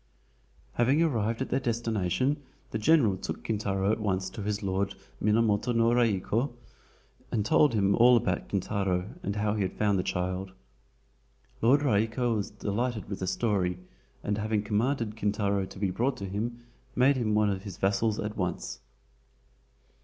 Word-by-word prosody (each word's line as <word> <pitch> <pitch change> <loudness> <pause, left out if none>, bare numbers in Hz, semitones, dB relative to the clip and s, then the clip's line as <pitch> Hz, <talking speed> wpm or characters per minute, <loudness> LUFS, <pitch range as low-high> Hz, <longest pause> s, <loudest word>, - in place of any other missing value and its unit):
Having 135 +7 +3
arrived 115 -5 0
at - - -8
their - - +2
destination 115 - 0 0.3
the 110 - -2
general 115 -6 +4
took - - -5
Kintaro 100 -2 0
at 110 - 0
once 95 -3 -1
to 110 - -7
his 105 +1 -2
Lord, 95 +1 -1 0.3
Minamoto 110 +2 +2
no 115 0 +4
Raiko, 115 +2 +1 0.8
and 105 -3 0
told 150 -4 +4
him 100 -1 +3
all 120 +2 +6
about 120 - -1
Kintaro 95 -1 -1
and 100 - -3
how 105 0 0
he 105 - -1
had 95 - -2
found 105 -2 +2
the - - 0
child. 95 +1 -2 1.1
Lord 130 +6 +5
Raiko 115 0 +1
was 105 -2 -2
delighted 105 +1 -3
with 100 - -4
the 95 - -3
story, 95 -4 0 0.5
and 105 0 -1
having 105 -1 0
commanded 110 +1 0
Kintaro 100 -2 0
to - - -12
be 95 -1 0
brought 125 +7 0
to 100 - -5
him, 115 +5 -4 0.3
made 135 +3 +4
him 110 -4 0
one 105 -1 +3
of 95 -1 -3
his 95 -3 -8
vassals 105 +2 +1
at 105 +1 -3
once. 85 - -3
105 Hz, 160 wpm, -28 LUFS, 100-120 Hz, 1.1 s, all